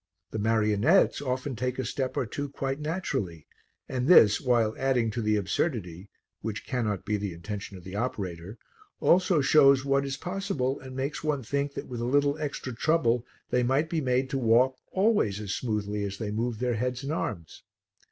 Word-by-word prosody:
The 110 - -3
marionettes 110 - +3
often 130 0 -2
take 125 +2 -2
a 130 - -2
step 130 +2 -3
or - - +1
two 145 +5 -4
quite 135 0 -3
naturally, 110 - -3 0.4
and 125 0 -2
this, 110 - +7
while 120 -4 +2
adding 125 -4 +1
to 115 - -3
the 105 -1 +2
absurdity 100 - -2 0.3
(which 110 -1 -5
cannot 110 -7 -2
be 105 0 0
the 100 -3 -4
intention 100 +3 -7
of 90 - -13
the 95 +2 -8
operator), 100 -4 -4 0.4
also 180 -3 +4
shows 140 -1 +5
what 140 0 +2
is 135 -1 -3
possible 180 -7 -2
and 130 -1 -10
makes 135 +4 -3
one 150 -4 -1
think 140 +4 -2
that - - -5
with 120 -2 -6
a - - -1
little 140 +3 +2
extra 140 -4 -4
trouble 125 -4 +1 0.2
they 125 - +3
might 135 +6 +1
be 165 -2 0
made 130 -1 +1
to 135 - 0
walk 125 +2 +4 0.2
always 190 - +2
as 100 -2 -4
smoothly 105 -3 -2
as 100 -1 -4
they 105 -1 -4
move 115 +2 -2
their 125 +1 0
heads 125 +3 -2
and 140 +3 -2
arms. 85 - -4
125 Hz, 185 wpm, -28 LUFS, 105-140 Hz, 0.4 s, this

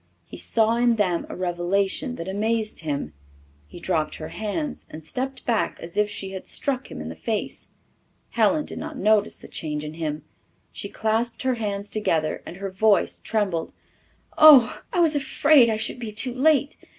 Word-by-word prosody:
He - - -11
saw 225 0 +1
in 240 -1 +3
them 185 -6 0
a - - -6
revelation 185 +7 -1
that 165 - -6
amazed 215 +2 -1
him; 145 - -3 0.5
he - - -11
dropped 160 -4 -1
her 155 - -7
hands 245 +7 -4
and 155 +1 -9
stepped 260 - -4
back 230 -3 0
as 170 0 -9
if 210 0 +2
she 195 -2 -5
had 190 -1 -7
struck 270 -2 -1
him - - -7
in - - -6
the - - -7
face. - - -3 0.6
Helen 235 +7 +2
did - - -7
not - - -6
notice 210 0 +2
the - - -13
change 150 -1 -4
in 150 - -6
him. 155 -2 -4 0.5
She 200 - -6
clasped 225 +4 -1
her 260 -1 +2
hands 205 -3 -3
together 160 -8 -1
and 175 - -8
her 195 0 -5
voice 205 +2 +2
trembled. 195 -7 -1 0.7
"Oh, 290 -6 +8
I 370 - 0
was 320 -3 +4
afraid 285 -2 +4
I 220 - 0
should 220 +3 -2
be 230 -3 -5
too 240 +4 -2
late! 285 +2 +2
215 Hz, 180 wpm, -24 LUFS, 175-245 Hz, 0.7 s, Oh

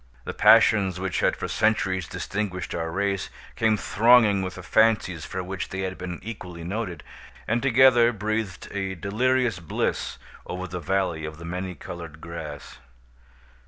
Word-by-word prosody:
The - - -5
passions 100 -5 +5
which 95 -4 -2
had - - +2
for - - -4
centuries 95 -5 +1
distinguished 95 -3 -4
our 80 -1 -2
race, 100 +2 -1 0.3
came 110 -2 +2
thronging 110 -2 +4
with 95 0 -4
the - - -9
fancies 105 -7 +2
for 95 - -4
which 95 +1 -5
they 95 - -4
had 95 -1 -3
been 90 -2 -5
equally 90 -6 -7
noted, 95 0 -4 0.4
and 115 +2 +1
together 125 -2 +5
breathed 110 -3 -3
a 95 -1 -3
delirious 115 +3 +1
bliss 85 - -2 0.3
over 90 +1 -4
the 90 0 -5
Valley 90 -1 -1
of 80 0 -6
the 85 - -9
Many 90 +2 -4
Colored 85 -4 -9
Grass. 80 -3 -8
95 Hz, 155 wpm, -25 LUFS, 90-110 Hz, 0.4 s, passions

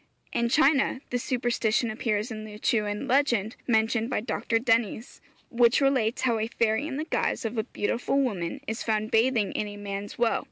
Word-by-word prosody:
In 235 0 +1
China, 275 -1 +3
the 245 - 0
superstition 240 -2 0
appears 215 +1 -1
in 215 -1 -5
a 210 - -10
Lew - - -9
chewan 210 -2 0
legend 240 -5 +2
mentioned 225 0 +2
by - - 0
Dr. 230 +1 -1
Dennys, 225 -1 0 0.3
which 235 0 +4
relates 260 -5 +1
how 235 -3 +2
a 220 - -1
fairy 230 +4 0
in 275 -3 -4
the 310 - -3
guise 290 - -1
of 225 +2 -3
a 220 -1 -1
beautiful 245 +4 -1
woman 195 -11 -2
is 220 +1 -4
found 215 -1 -1
bathing 225 -2 +2
in 210 - -2
a 205 0 -8
man's 200 0 -6
well. 235 -1 +2
230 Hz, 190 wpm, -27 LUFS, 215-245 Hz, 0.3 s, which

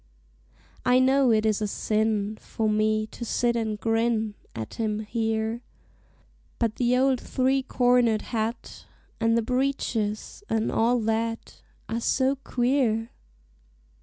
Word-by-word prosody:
I 250 0 +4
know 260 0 +4
it 215 -1 +2
is 215 -1 +1
a 210 - 0
sin 215 0 0
For 220 - -2
me 215 0 +1
to 225 - -9
sit 235 +1 0
and 220 -2 -2
grin 225 -1 0 0.2
At 110 -1 -6
him 215 -2 -2
here, 220 +1 -2 1.0
But 230 -2 -1
the 245 0 +2
old 260 -1 +3
three 265 +1 +1
cornered 245 -4 +2
hat, 225 0 -4 0.3
And 230 0 +2
the 230 - +1
breeches, 250 - -2
and 225 0 0
all 240 +2 +2
that, 225 +1 -2 0.3
Are 230 - -2
so 265 +3 +2
queer! 245 -3 0
225 Hz, 130 wpm, -26 LUFS, 220-250 Hz, 1.0 s, I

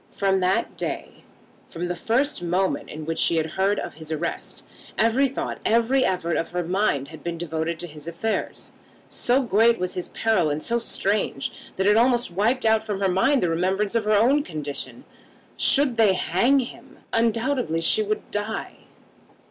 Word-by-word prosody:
From 195 -1 +1
that 185 +1 0
day, - - -5 0.4
from 175 +2 -4
the 175 - -2
first 235 - 0
moment 175 -2 -1
in 155 0 -7
which 165 +1 -3
she 170 - +3
had 160 -1 0
heard 195 +3 +1
of - - -4
his 160 0 -9
arrest, 160 +2 -4 0.3
every 230 +5 +3
thought, 270 - -4
every 235 +4 +3
effort 175 -5 0
of 165 - -2
her 180 0 -2
mind 170 -6 0
had 160 -1 -12
been 170 -1 -3
devoted 165 0 -3
to 175 - -5
his 155 -2 -10
affairs. 170 +7 -3 0.4
So 255 +3 +2
great 230 +1 +4
was 180 0 -2
his 180 - -4
peril 220 -8 +1
and 150 +1 -2
so 235 0 0
strange, 200 -9 -1 0.3
that 190 - 0
it 210 +2 +5
almost 240 -2 +3
wiped 225 +8 +1
out 220 0 +4
from 210 -3 -3
her 195 -1 +2
mind 250 +9 +2
the 175 - +2
remembrance 190 +5 0
of 230 -2 0
her 215 0 +4
own 260 +7 +4
condition. 150 - -6 0.5
Should 270 -4 +3
they 215 -4 +5
hang 190 +9 +2
him, 245 - -10 0.2
undoubtedly 230 - +1
she 165 - +3
would 215 0 -3
die. 210 +1 -4
195 Hz, 180 wpm, -24 LUFS, 170-230 Hz, 0.5 s, it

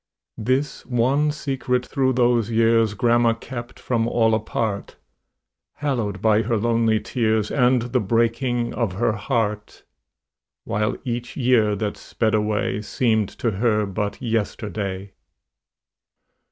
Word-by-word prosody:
This 130 +6 -1
one 130 +5 +2
secret 135 -4 -1
through 130 -1 +1
those 120 -3 +2
years 115 -1 +3
Grandma 120 +1 +3
kept 120 +1 -8
from 115 -2 0
all 115 -2 +2
apart, 110 -1 -2 0.8
Hallowed 115 -9 -2
by 110 -1 +4
her 115 +1 0
lonely 115 0 +2
tears 110 -3 0
And 125 -3 +3
the 125 +1 0
breaking 115 +3 0
of 110 -5 -1
her 115 +4 +1
heart; 105 -1 -2 0.8
While 105 +3 -1
each 120 -2 -4
year 120 -5 +3
that 105 0 -3
sped 110 -1 -1
away 105 -1 0
Seemed 110 -2 0
to 115 - 0
her 105 +1 +1
but 100 +1 -3
yesterday. 105 -4 -3
115 Hz, 120 wpm, -22 LUFS, 105-120 Hz, 0.8 s, by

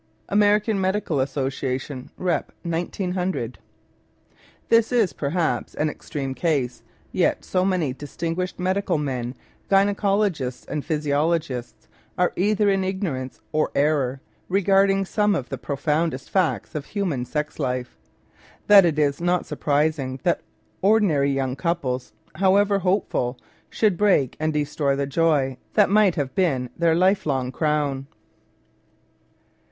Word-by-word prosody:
(Amer. 205 +1 +5
Med. 195 -3 +1
Assoc. 135 -5 -2
Rep. 180 -1 -1
1 170 0 -2
900.) 180 - -2 1.1
This 230 0 +4
is, 230 -7 +2
perhaps, 160 +3 -1
an 150 0 0
extreme 135 -3 -5
case, 130 -3 -1 0.3
yet - - +1
so 185 -1 +1
many 180 -8 0
distinguished 165 +6 -4
medical 185 -1 0
men, 130 -4 -3 0.3
gyne 200 +1 +4
cologists 195 -11 0
and 150 -2 -4
physiologists, 150 -4 -1 0.3
are 180 0 +2
either 205 +2 +2
in 195 -1 +2
ignorance 180 -10 -3
or 155 0 +1
error 140 -3 +1 0.3
regard 195 +1 +4
ing 195 0 +1
some 210 +1 +1
of 130 -8 -3
the 135 - -4
profoundest 150 +1 -1
facts 185 -4 0
of 150 -2 -4
human 180 -12 -2
sex 150 +4 -4
life, 125 0 -2 0.7
that 200 -3 +8
it 160 -3 +1
is 145 0 +1
not 175 0 +1
surprising 145 -3 0
that - - +1 0.4
ordinary 190 -9 +3
young 135 -2 -1
couples, 140 -4 -2 0.2
however 195 +3 +3
hopeful, 180 -10 0 0.3
should 210 -5 +1
break 195 -11 +3
and 155 0 0
destroy 145 -2 0
the 140 0 -1
joy 140 -3 +1 0.2
that 205 -2 +4
might 205 -3 +4
have 140 -5 -2
been 135 -10 0
their 165 -1 +2
life 185 +1 +2
long 130 -3 0
crown. 145 -2 -1
160 Hz, 130 wpm, -23 LUFS, 135-190 Hz, 1.1 s, that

